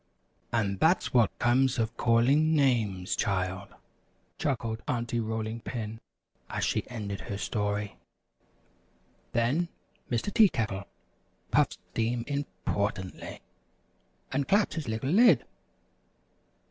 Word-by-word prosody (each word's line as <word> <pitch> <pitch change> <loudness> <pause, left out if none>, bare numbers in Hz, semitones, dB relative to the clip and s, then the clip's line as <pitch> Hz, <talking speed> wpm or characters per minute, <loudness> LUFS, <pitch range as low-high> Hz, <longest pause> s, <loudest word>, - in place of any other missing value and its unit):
"And 100 -5 0
that's 175 +3 +3
what 120 -4 +3
comes 125 +2 +3
of 115 0 -1
calling 135 +8 +3
names, 110 -10 +1
child," 95 0 -2 0.6
chuckled 115 -5 -1
Aunty 120 -1 -1
Rolling 110 0 -3
Pin, 115 -2 -5 0.5
as - - -1
she - - -1
ended 105 -5 -4
her 100 - -5
story. 105 -1 -2 1.4
Then 130 +9 +2 0.4
Mr. 120 - -1
Tea 220 -4 +7
Kettle 100 - -2 0.7
puffed - - +3
steam 115 +1 0
importantly, 100 -7 -3 0.9
and 135 +1 0
clapped 200 +1 +3
his 160 -5 -4
little 110 +5 -1
lid. 235 +6 +6
115 Hz, 105 wpm, -29 LUFS, 105-135 Hz, 1.4 s, Tea